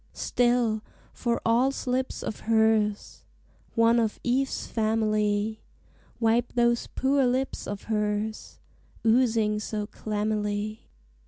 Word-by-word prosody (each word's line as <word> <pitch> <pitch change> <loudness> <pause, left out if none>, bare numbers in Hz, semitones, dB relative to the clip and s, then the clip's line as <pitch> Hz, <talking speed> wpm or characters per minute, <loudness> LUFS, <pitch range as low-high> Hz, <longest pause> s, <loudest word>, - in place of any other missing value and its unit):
Still, 240 -3 +1 0.3
for 235 -1 -1
all 235 +4 +4
slips 260 -1 -2
of - - -4
hers, 220 -2 +2 0.5
One 230 +1 +4
of 220 -2 -1
Eve's 260 +2 0
family, 215 -1 0 0.6
Wipe 235 +1 +2
those 235 -1 +2
poor 275 +1 +1
lips 260 +2 -1
of 205 -1 -5
hers, 210 0 -2 0.5
Oozing 225 -3 +3
so 210 0 -3
clammily. 210 0 -3
220 Hz, 100 wpm, -27 LUFS, 210-240 Hz, 0.6 s, all